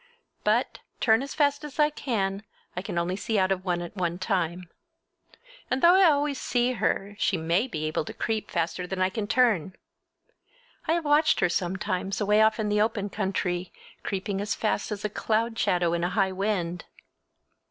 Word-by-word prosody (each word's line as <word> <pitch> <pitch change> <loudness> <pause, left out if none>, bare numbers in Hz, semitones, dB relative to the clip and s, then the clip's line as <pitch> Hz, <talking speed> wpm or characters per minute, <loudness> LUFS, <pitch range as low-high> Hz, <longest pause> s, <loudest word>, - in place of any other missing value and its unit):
But, - - +1 0.2
turn 225 -1 +4
as 275 0 -6
fast 285 0 +2
as 295 -2 -8
I 300 0 +4
can, 200 -9 -2 0.3
I 180 - -2
can 185 - -5
only 170 +2 0
see 215 +2 -1
out 190 -1 +2
of 185 -1 -1
one 175 -2 -1
at 175 - -9
one 175 -3 -1
time. 180 -2 -1 1.0
And 255 +1 -1
though 345 +1 +8
I 375 -2 +6
always 285 -2 0
see 245 0 +1
her 205 -2 -1
she 190 - +1
may 170 +8 +1
be 155 -10 -4
able 155 0 -1
to - - -7
creep 220 -1 -2
faster 175 +1 -2
than 190 0 -4
I 185 0 +2
can 210 0 -3
turn! 210 -8 +2 1.1
I 320 - +3
have 335 -2 -1
watched 295 +1 +4
her 180 - +3
sometimes 185 +2 -2
away 210 +1 +3
off 220 +1 +3
in 210 -1 0
the 210 0 +2
open 210 -2 0
country, 185 -3 -2 0.3
creeping 195 0 -3
as 205 +1 -1
fast 215 -1 -1
as 210 0 -4
a - - +3
cloud 225 +2 -1
shadow 175 -2 +2
in 170 0 -1
a 175 - +1
high 190 +1 +1
wind. 185 -3 -2
200 Hz, 190 wpm, -27 LUFS, 180-230 Hz, 1.1 s, though